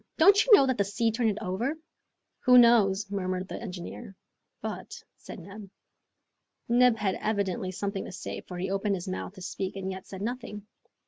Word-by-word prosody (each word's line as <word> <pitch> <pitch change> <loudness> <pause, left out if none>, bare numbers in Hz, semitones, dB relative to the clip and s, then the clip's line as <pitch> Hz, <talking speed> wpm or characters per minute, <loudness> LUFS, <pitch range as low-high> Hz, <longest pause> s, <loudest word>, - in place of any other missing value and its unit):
"Don't 400 +5 +6
you - - -1
know 275 - +5
that 260 -4 -1
the - - +4
sea 215 +3 0
turned 225 0 +1
it 205 - -2
over?" 235 +12 -2 0.7
"Who 250 -1 +7
knows?" 215 -5 +5
murmured 185 -2 -2
the - - -7
engineer. 195 +1 -8 0.4
"But, - - -6
" - - -54
said - - -10
Neb. 195 +2 -10 1.0
Neb 245 -1 +4
had 195 -3 -1
evidently 195 -3 -1
something 200 +1 -4
to - - -8
say, - - -6
for 180 - -9
he 185 +2 -3
opened 195 +1 0
his 180 -1 -6
mouth 185 +1 -5
to 185 - -10
speak 190 +2 -4
and 190 -1 -4
yet 190 0 -8
said 190 0 -7
nothing. 230 -3 -5
200 Hz, 190 wpm, -28 LUFS, 190-235 Hz, 1.0 s, Who